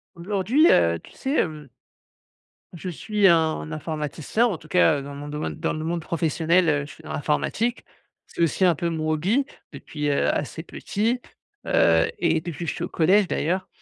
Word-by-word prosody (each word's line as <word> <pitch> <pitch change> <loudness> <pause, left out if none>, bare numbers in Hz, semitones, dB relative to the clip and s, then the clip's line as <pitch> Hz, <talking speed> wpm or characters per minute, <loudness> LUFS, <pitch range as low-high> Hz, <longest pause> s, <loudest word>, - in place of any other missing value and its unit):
Aujourd'hui, 205 - +2
heu, 85 -1 +3
tu - - -17
sais 270 +2 -3
hem 150 - -1 1.0
je 180 +2 -6
suis 205 +3 +1
un 160 -2 +2
informaticien 155 - -1
en 210 -8 0
tout 155 - -16
cas, 160 -3 +4
heu, - - -6
dans 140 +1 -8
mon 145 +1 -7
domaine 150 +1 -4
dans - - -2
le 155 - -4
monde 170 +1 -2
professionnel, 165 +2 +1
heu, 145 -2 +2
je 145 - -11
suis 160 - -17
dans - - -8
l'informatique. 220 - -1 0.4
C'est - - -6
aussi 165 +3 +1
un 175 -2 +5
peu 170 +3 -2
mon 155 -1 -2
hobby, 190 - +1 0.3
depuis, 150 -1 -4
heu, 140 - +1
assez 150 +2 -3
petit, 220 +7 -2 0.5
heu 80 -1 +4
et- 165 -2 +2
depuis 170 0 -5
que - - -1
je - - -7
suis - - -5
au - - -3
collège, 185 +5 +3
d'ailleurs- 185 +2 -1
165 Hz, 190 wpm, -24 LUFS, 150-185 Hz, 1.0 s, un